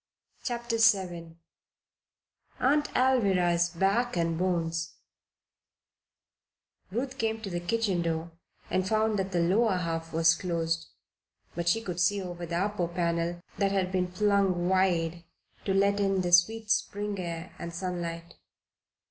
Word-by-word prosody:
CHAPTER 235 -2 -2
VII 180 -7 +2 1.2
AUNT 295 +3 +2
ALVIRAH'S 190 -9 +3
BACK 195 +6 +1
AND 165 -1 +1
BONES 165 -2 -1 1.9
Ruth 255 +6 -4
came 225 0 0
to 200 -3 -5
the 175 - -2
kitchen 190 0 0
door 165 0 -2 0.4
and 185 0 +1
found 215 0 +1
that 190 0 -2
the 175 - +1
lower 195 +3 +3
half 165 -2 -3
was 165 0 +4
closed; 165 -2 -2 0.7
but 170 0 -1
she 225 +6 +2
could 180 -4 -4
see 200 +4 +2
over 175 -2 -6
the 170 +1 -2
upper 195 -2 0
panel 170 0 -1 0.2
that 200 -1 +2
had 190 -2 0
been 180 -1 0
flung 195 -2 +2
wide 175 -3 +1 0.4
to 195 - +1
let 200 +1 +3
in 195 -1 +1
the 175 -1 -2
sweet 215 +5 +4
Spring 205 -1 -1
air 170 0 -5
and 170 - -5
sunlight. 170 -1 -5
180 Hz, 135 wpm, -28 LUFS, 170-205 Hz, 1.9 s, was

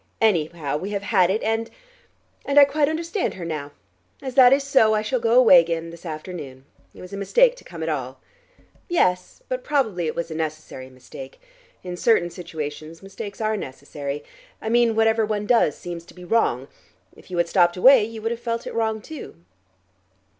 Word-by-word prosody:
Anyhow, 160 -8 0
we 185 +6 -5
have 200 0 -3
had 190 -4 +3
it 210 +4 -1
and 225 +1 -1 0.7
and 280 - -1
I 285 - +10
quite 290 +1 +1
understand 335 +4 -2
her 180 - -7
now. 150 -3 -4 0.5
As 260 -1 -6
that 250 -1 +7
is 275 +1 +4
so, 245 -6 +4
I 215 - 0
shall 255 +3 -1
go 230 +1 +2
away 220 -8 +8
again 165 0 -2
this 170 +1 -11
afternoon. 155 -5 -8 0.3
It - - -12
was 180 +1 -11
a - - -4
mistake 480 - +3
to - - -15
come 165 -2 -8
at - - -3
all." 130 -4 -4 0.7
"Yes, 180 - 0
but - - -3
probably 225 - 0
it - - -3
was 170 -1 -4
a - - -3
necessary 155 -4 -5
mistake. 130 +1 -12 0.4
In 180 -1 -5
certain 175 -5 +2
situations 155 -1 -7
mistakes 200 +1 -8
are 215 0 0
necessary: 140 -3 -6 0.4
I 220 - -4
mean 235 -1 +3
whatever 225 0 +3
one 210 -1 -2
does 230 - +3
seems 170 -1 -7
to - - -17
be 180 -1 -11
wrong. 155 - +1 0.5
If - - -18
you 180 - -4
had 170 0 +2
stopped 175 0 +3
away, 255 +4 +7
you 220 0 -7
would 225 - -1
have 235 - -4
felt 235 -1 -3
it - - -6
wrong 220 -1 -1
too." 315 +3 -9
195 Hz, 195 wpm, -23 LUFS, 165-230 Hz, 0.7 s, I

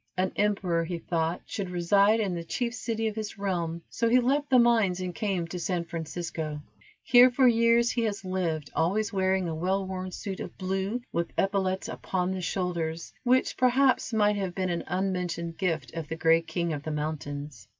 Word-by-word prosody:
An 185 0 +1
emperor, 190 -5 +1
he 170 +1 -3
thought, 165 0 -1
should 195 -3 -4
reside 200 +5 +3
in 200 -4 0
the 170 -1 -4
chief 235 +8 -2
city 225 -1 -2
of 215 - -3
his 215 -1 -5
realm, 170 -4 -2
so 230 - 0
he 250 +2 +5
left 280 +4 +1
the 260 - +6
mines 225 -7 +4
and 180 -1 -3
came 190 -3 -1
to 180 - -5
San 175 -1 -1
Francisco. 160 -2 -4 0.4
Here 245 +1 +7
for 255 +1 +4
years 235 0 +4
he 240 - -1
has 205 -2 -3
lived, 165 -6 -2
always 200 +7 +1
wearing 190 -1 +1
a 165 - -2
well 190 +4 0
worn 185 0 -4
suit 195 0 -5
of - - -7
blue, 190 +5 -2
with 170 0 -2
epaulettes 190 -1 0
upon 185 -1 -2
the 190 -1 -3
shoulders, 170 -3 -2
which, 255 +1 +2
perhaps, 255 +1 +3
might 210 -2 +3
have 190 -3 -3
been 185 -2 -1
an 170 - -3
unmentioned 180 -2 -2
gift 160 -10 -1
of 165 -2 -5
the 165 - -4
gray 165 0 +4
king 170 0 -2
of 145 - -4
the 155 - -5
mountains. 145 -5 -5
185 Hz, 190 wpm, -28 LUFS, 170-210 Hz, 0.4 s, Here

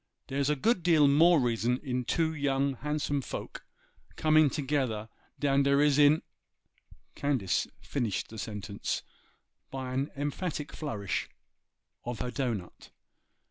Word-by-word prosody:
Dere's 140 +1 -1
a 150 - +3
good 205 - +1
deal 160 -4 +5
more 160 +4 +6
reason 120 0 +1
in 125 -3 -2
two 160 +4 +1
young, 140 -2 0
handsome 145 +1 -1
folks - - -6 0.5
coming 155 -1 +4
together 130 -7 -1 0.3
dan 140 -1 +3
der 140 0 +3
is 145 -1 +4
in——' 145 +2 +5 0.9
Candace 135 -10 0
finished 120 -8 -2
the 110 - -8
sentence 105 -1 -4 0.7
by 130 -1 -5
an 135 +3 -1
emphatic 145 +1 -3
flourish 110 - -3 0.7
of 120 -1 -4
her 125 +2 -3
dough 130 -3 -1
nut. 90 -4 -10
140 Hz, 130 wpm, -30 LUFS, 125-150 Hz, 0.9 s, more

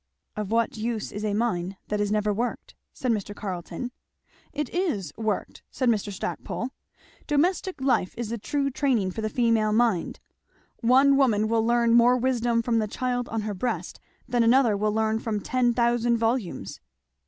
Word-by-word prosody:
"Of 210 -2 -4
what 230 0 +1
use 220 -1 -3
is 205 - -5
a 210 -1 0
mine 195 -4 -1
that 210 0 0
is 205 0 0
never 210 0 +1
worked?" 240 +4 -3 0.2
said 255 - -2
Mr. 205 -2 -2
Carleton. 185 +4 -5 0.6
"It 295 -1 -2
is 225 - -1
worked," 220 -2 -3
said 255 -2 0
Mr. 210 -2 0
Stackpole. 220 +5 -4 0.6
"Domestic 340 +3 +1
life 260 -8 +1
is 235 -2 -3
the 235 0 -3
true 275 +5 -1
training 245 -9 +1
for 220 - -5
the 215 - -1
female 225 -2 +2
mind. 220 -6 +1 0.6
One 270 +4 +5
woman 220 -6 +3
will 225 0 +2
learn 235 0 +3
more 240 +1 +6
wisdom 240 -2 +1
from 230 -1 +1
the 215 - 0
child 245 +2 -2
on 225 -1 -2
her 210 0 -3
breast 235 +6 -3 0.3
than 240 -1 +1
another 235 -1 +4
will 210 +1 0
learn 220 +1 +1
from 220 -2 -2
ten 245 +3 +1
thousand 235 0 +2
volumes." 225 - -2
230 Hz, 170 wpm, -26 LUFS, 210-245 Hz, 0.6 s, more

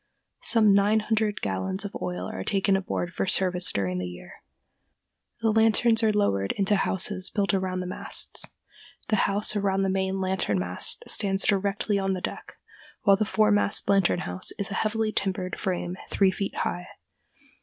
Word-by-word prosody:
Some 215 -3 +4
nine 205 +2 +3
hundred 215 -1 -1
gallons 100 - -2
of 200 - -7
oil 90 0 -4
are 95 - -5
taken 195 - +1
aboard 180 -2 -3
for - - -2
service 180 -1 +2
during 90 -2 -2
the 90 - -3
year. 90 -9 -12 1.0
The 225 -1 +2
lanterns 225 +1 +3
are 220 -1 +3
lowered 100 - 0
into 200 +1 +2
houses 190 0 +2
built 200 -1 0
around 185 -1 -1
the - - -5
masts. 180 - -2 0.6
The 215 - +3
house 205 +2 +2
around 195 -1 0
the 195 - 0
main 190 0 -1
lantern 185 - 0
mast 90 0 -1
stands 195 -1 +1
directly 200 +1 +1
on 195 0 0
the 185 - -3
deck, - - -6 0.5
while 200 -2 +6
the 215 - 0
foremast 210 -1 +2
lantern 195 -3 +2
house 185 - -3
is 200 -1 -2
a - - -1
heavily 220 0 0
timbered 185 -3 -2
frame 180 -2 -2
three 195 -2 +3
feet 195 +1 -4
high. 180 0 -3
195 Hz, 165 wpm, -26 LUFS, 180-205 Hz, 1.0 s, while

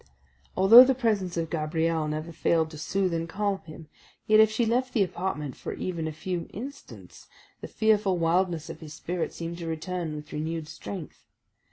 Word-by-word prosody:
Although 225 +6 +10
the 265 0 +2
presence 205 -8 0
of 165 -1 -2
Gabrielle 160 0 0
never 155 +2 -4
failed 160 -1 +1
to 155 - -9
soothe 185 +3 0
and 165 0 -2
calm 200 +1 -1
him, 155 0 -11 0.4
yet 215 0 +5
if 220 -1 +7
she 220 +2 0
left 250 +3 0
the 215 - +4
apartment 170 -6 -4
for - - -6
even 170 -3 -3
a - - -3
few 170 +3 -4
instants, 275 +7 -10 0.3
the - - -7
fearful 210 -4 +2
wildness 170 -1 +1
of - - -8
his 155 -2 -10
spirit 175 -1 -3
seemed 170 +1 -6
to 170 - -5
return 165 0 -3
with 150 0 -9
renewed 160 +1 -3
strength. 165 +1 -8
170 Hz, 180 wpm, -27 LUFS, 160-200 Hz, 0.4 s, Although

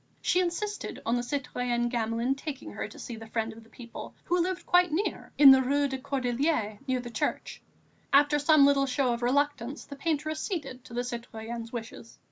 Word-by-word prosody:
She 360 - +2
insisted 385 +4 -2
on 230 - +2
the 245 - 0
citoyen 245 -2 -1
Gamelin 235 +1 0
taking 275 -1 -6
her - - -4
to - - -13
see 240 - -7
the 225 0 -10
Friend 225 0 -2
of 225 +1 -13
the 225 - -21
People, 235 -1 -10
who 355 +1 +1
lived 365 +1 -2
quite 355 -1 +4
near, 365 +7 -2
in 280 -2 +10
the 265 0 +7
Rue 285 +2 +2
des 265 -1 -4
Cordeliers, 255 -4 -1
near 260 -1 +1
the 240 -1 -7
church. 215 - -3 0.5
After 290 +1 +5
some 290 -1 +6
little 280 -1 +4
show 255 -1 +1
of 235 - -4
reluctance, 280 +1 0
the 280 - -9
painter 310 +1 -1
acceded 305 - -4
to 235 - -10
the 245 - 0
citoyenne's 235 -1 -6
wishes. 125 - -8
260 Hz, 195 wpm, -28 LUFS, 235-290 Hz, 0.5 s, in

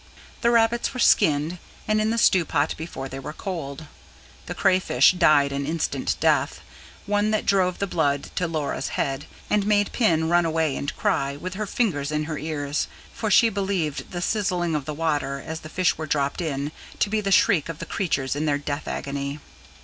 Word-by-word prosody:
The 235 - +3
rabbits 235 +2 +2
were - - -4
skinned 160 -6 +3 0.3
and 215 0 +2
in 215 - +1
the 230 - 0
stew 190 -5 +4
pot 150 -1 0
before 155 -5 -6
they 135 0 -7
were 145 +3 -7
cold; 160 -5 -5 0.6
the - - -4
crayfish 185 0 +4
died 150 -6 +4
an 140 0 -3
instant 165 +1 -1
death: - - +2 0.5
one 205 +1 +1
that 215 -1 0
drove 185 -2 +2
the 200 - -1
blood 145 -6 0
to 180 - +1
Laura's 155 -3 -2
head, 135 +1 -2 0.2
and 205 -1 +1
made 205 -1 +2
Pin 165 -9 +2
run 175 +1 +4
away 160 -3 0
and 140 - -4
cry, 140 0 0
with 180 +6 -6
her 210 +2 -3
fingers 165 -12 0
to 150 0 -1
her 155 -1 -4
ears; 145 -1 -2 0.3
for 220 - -2
she 230 +3 +6
believed 190 -7 -2
the 175 0 -4
sizzling 180 -6 0
of 150 -3 -2
the 150 - -4
water, 145 -3 -1
as 160 0 -5
the 155 - -10
fish 180 -1 +1
were 155 - -4
dropped 140 +3 0
in, 145 -3 -2 0.3
to - - +2
be 215 +1 0
the 200 -1 -2
shriek 175 -5 +4
of 165 - -5
the - - -6
creatures 140 -8 -1
in 150 +2 -1
their 145 -1 +2
death 145 +1 -4
agony. 140 +1 -4
160 Hz, 195 wpm, -24 LUFS, 145-195 Hz, 0.6 s, she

